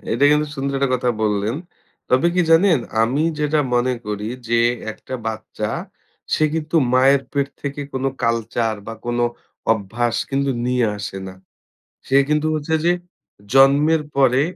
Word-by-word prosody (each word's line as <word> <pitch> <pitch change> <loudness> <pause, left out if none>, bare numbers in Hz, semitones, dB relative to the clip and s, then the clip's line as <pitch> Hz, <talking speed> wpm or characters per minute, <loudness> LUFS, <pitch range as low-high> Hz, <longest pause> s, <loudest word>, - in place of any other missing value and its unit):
এটা 135 +5 +2
কিন্তু 150 0 +3
সুন্দর 140 +1 -2
একটা 135 -1 +1
কথা 125 -1 +1
বললেন। 105 +2 0 0.6
তবে 130 +6 +4
কি 180 - +3
জানেন? 165 0 +5 0.2
আমি 130 +7 +1 0.2
যেটা 150 0 +1
মনে 125 +1 +2
করি 105 0 -3 0.2
যে 115 0 +3 0.3
একটা 130 - -9
বাচ্চা 110 0 -4 0.7
সে 155 - +2
কিন্তু 160 +1 -1 0.2
মায়ের 135 +2 +5
পেট 140 -1 0
থেকে 145 0 -4
কোনো 135 0 0
culture 115 -1 0
বা 115 - -5
কোনো 120 0 +1 0.5
অভ্যাস 115 +3 -1
কিন্তু 140 0 0 0.2
নিয়ে 125 -2 +2
আসে 95 -1 -5
না। 95 - -8 0.7
সে 135 - +4
কিন্তু 150 +1 +1
হচ্ছে 155 +1 -3
যে 175 - +5 0.6
জন্মের 140 +4 +5
পরে, 135 -1 +4
135 Hz, 150 wpm, -20 LUFS, 115-145 Hz, 0.7 s, জানেন